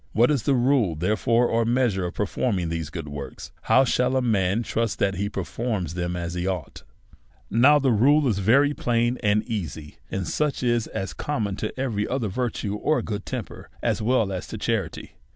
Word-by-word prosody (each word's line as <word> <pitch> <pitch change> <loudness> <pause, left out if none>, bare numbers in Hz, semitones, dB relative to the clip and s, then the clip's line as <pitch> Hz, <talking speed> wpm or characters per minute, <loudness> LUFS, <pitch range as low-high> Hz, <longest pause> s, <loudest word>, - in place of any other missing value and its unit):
What 120 +5 +4
is 140 -5 +1
the 135 +5 +2
rule, 120 - +2
therefore, 110 +7 +2
or 115 0 +1
measure 115 -6 +1
of - - -8
performing 100 -4 -1
these 80 -2 -3
good 80 -2 -6
works? 70 -1 -7
How 130 - +4
shall 125 +1 +1
a 130 - +3
man 105 -1 +1
trust 115 -1 -1
that 100 -1 +1
he 100 +1 -1
performs 105 -7 -3
them 90 0 -2
as 85 -1 -4
he 90 +1 -2
ought? 90 -5 -4 0.7
Now, 130 +8 +6
the 135 -3 +2
rule 140 +7 +4
is 105 -5 +1
very 135 +9 +4
plain 120 -1 0
and 105 -1 +2
easy, 85 -9 -5
and 95 -3 -3
such 150 - -1
as 120 -2 +1
is 95 - -4
common 110 -10 -2
to 110 +4 -4
every 110 -6 -1
other 125 -4 -1
virtue 110 -2 -2
or 155 +8 +1
good 105 -2 -5
temper, - - -6
as - - 0
well 110 -3 +2
as 90 -2 -4
to - - -6
charity. - - -2
110 Hz, 190 wpm, -24 LUFS, 95-125 Hz, 0.7 s, Now